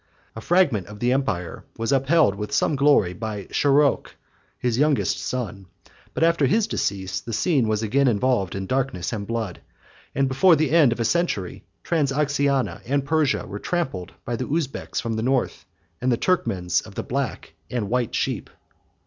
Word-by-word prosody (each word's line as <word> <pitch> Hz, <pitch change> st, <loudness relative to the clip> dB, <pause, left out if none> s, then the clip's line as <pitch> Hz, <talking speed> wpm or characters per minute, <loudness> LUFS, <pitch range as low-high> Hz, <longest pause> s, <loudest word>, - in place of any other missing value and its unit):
A 110 Hz, -, -7 dB
fragment 165 Hz, -, +2 dB
of 105 Hz, 0 st, -10 dB
the 120 Hz, +2 st, +2 dB
empire 110 Hz, -11 st, -2 dB
was 115 Hz, +3 st, -1 dB
upheld 135 Hz, -2 st, +3 dB
with 105 Hz, +1 st, -6 dB
some 150 Hz, -, +1 dB
glory 140 Hz, -10 st, +3 dB
by 105 Hz, +1 st, -5 dB
Sharokh, 145 Hz, 0 st, +3 dB, 0.5 s
his 120 Hz, -1 st, -1 dB
youngest 150 Hz, -1 st, +2 dB
son; 105 Hz, -7 st, -4 dB, 0.5 s
but -, -, +1 dB
after 165 Hz, -4 st, +3 dB
his 215 Hz, -, +2 dB
decease, 95 Hz, -, -2 dB
the 115 Hz, -, -7 dB
scene 130 Hz, +1 st, +2 dB
was 110 Hz, 0 st, 0 dB
again 135 Hz, +6 st, +2 dB
involved 115 Hz, -5 st, +1 dB
in 95 Hz, 0 st, -3 dB
darkness 125 Hz, -5 st, -2 dB
and 100 Hz, -2 st, -4 dB
blood; 115 Hz, -5 st, -3 dB, 0.5 s
and 135 Hz, 0 st, +2 dB
before 160 Hz, +7 st, +5 dB
the 155 Hz, 0 st, 0 dB
end 155 Hz, -6 st, +5 dB
of 120 Hz, -, -3 dB
a 115 Hz, -, 0 dB
century, 115 Hz, -, -1 dB, 0.2 s
Transoxiana 140 Hz, -3 st, 0 dB
and 140 Hz, +1 st, 0 dB
Persia 155 Hz, -2 st, +1 dB
were 100 Hz, -, -7 dB
trampled 130 Hz, -, -3 dB
by 120 Hz, -, -2 dB
the 125 Hz, +2 st, -4 dB
Uzbeks 150 Hz, -3 st, -2 dB
from 115 Hz, -, -3 dB
the -, -, -1 dB
north, 130 Hz, +2 st, -1 dB, 0.4 s
and 130 Hz, +1 st, +1 dB
the 120 Hz, -, +2 dB
Turkmans 95 Hz, -, 0 dB
of -, -, -13 dB
the -, -, -3 dB
black -, -, -3 dB, 0.2 s
and 120 Hz, -5 st, -2 dB
white 120 Hz, +1 st, -1 dB
sheep. -, -, -2 dB
125 Hz, 175 wpm, -23 LUFS, 105-145 Hz, 0.5 s, before